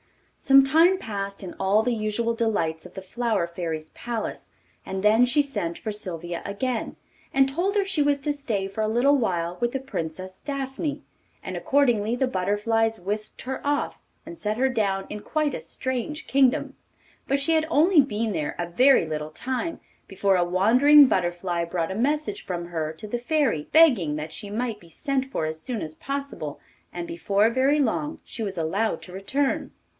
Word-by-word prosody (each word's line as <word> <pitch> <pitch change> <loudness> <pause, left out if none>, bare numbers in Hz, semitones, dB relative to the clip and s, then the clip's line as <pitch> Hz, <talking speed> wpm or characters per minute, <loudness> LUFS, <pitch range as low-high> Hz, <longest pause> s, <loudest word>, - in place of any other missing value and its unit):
Some 275 0 +6
time 330 +7 +5
passed 200 - -5
in 180 - -6
all 205 +3 +3
the 245 - +1
usual 225 +1 -1
delights 185 -8 -1
of 180 - -20
the 190 - -7
Flower 225 -2 0
Fairy's 165 -2 -5
palace, 235 -2 -5 0.3
and 190 0 -4
then 220 +3 +5
she 290 +4 +3
sent 170 -12 -3
for 215 - -4
Sylvia 175 -4 -5
again, 225 +4 -3 0.4
and 270 0 +4
told 350 +9 -1
her 405 -1 +2
she 370 -6 0
was 290 0 +3
to 295 +1 0
stay 225 -9 -2
for 195 +3 -4
a 215 - +1
little 245 +6 +3
while 180 -8 -1
with 240 0 +1
the 270 - -1
Princess 185 -7 -6
Daphne, 275 +1 -3 0.4
and - - -5
accordingly 240 -5 +2
the 265 - +1
butterflies 220 +2 0
whisked 210 +4 -4
her 265 +1 -4
off, 290 0 -1 0.3
and 330 +2 -8
set 215 -8 -2
her 265 +2 +2
down 200 -6 0
in 210 - -4
quite 305 +5 -1
a - - -4
strange 260 +5 -4
kingdom. 265 -2 +2 0.5
But 275 +1 +2
she 280 +4 +2
had 315 0 +2
only 325 +1 +5
been 225 -4 -2
there 155 -4 -2
a 175 - -1
very 250 +4 +5
little 155 -1 -4
time 260 - -3 0.3
before 195 0 +1
a 180 - +3
wandering 245 +12 +6
butterfly 175 -4 0
brought 170 0 -2
a - - -3
message 300 - -1
from 175 -2 -4
her 160 -2 -2
to 160 +7 -9
the 240 +3 -2
Fairy, 255 - 0
begging 245 - +5
that 155 +1 -5
she 205 - -6
might 225 0 -2
be 170 - -17
sent 275 - -1
for 265 -12 -3
as 155 0 -4
soon 235 -1 -3
as 155 - -6
possible, 275 - -5 0.3
and 175 -1 -5
before 200 +6 +1
very 270 +4 +3
long 295 +4 -1
she 235 - -8
was 195 -4 -3
allowed 195 +7 -1
to 180 - -11
return. 265 +9 -1
225 Hz, 185 wpm, -25 LUFS, 185-275 Hz, 0.5 s, Some